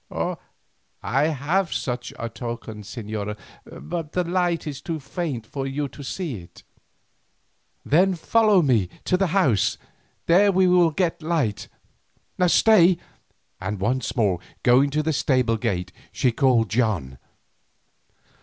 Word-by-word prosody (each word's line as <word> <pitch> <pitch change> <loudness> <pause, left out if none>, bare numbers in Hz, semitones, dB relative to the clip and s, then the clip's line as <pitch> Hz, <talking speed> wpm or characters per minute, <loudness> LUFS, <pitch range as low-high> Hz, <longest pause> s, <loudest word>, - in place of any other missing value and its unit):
"I 140 +3 +1
have 160 +4 0
such 125 -2 -3
a 115 - -4
token, 115 -1 -7
señora, 105 -1 -5 0.3
but 165 -3 -6
the 180 - +1
light 175 -1 0
is 145 -2 -6
too 165 0 -4
faint 140 - -4
for 135 +4 -5
you 140 +2 -2
to 140 +3 -11
see 150 - -4
it." 85 - -17 1.2
"Then 185 +5 +3
follow 210 +1 +3
me 115 -10 +2 0.2
to - - +2
the 195 +1 +1
house, 155 - +2 0.5
there 195 +4 +5
we 190 0 +3
will 180 -2 +5
get 170 +1 -1
light. 155 -10 -1 0.8
Stay," 185 -2 +5 0.6
and 95 +2 -4
once 120 +5 -1
more 100 -8 +1 0.2
going 130 +3 +5
to 150 +2 -1
the 160 +1 0
stable 125 -5 +1
gate, 100 -6 -2 0.2
she 125 - +1
called 125 -3 +2
"John." 100 - -1
140 Hz, 130 wpm, -23 LUFS, 115-170 Hz, 1.2 s, there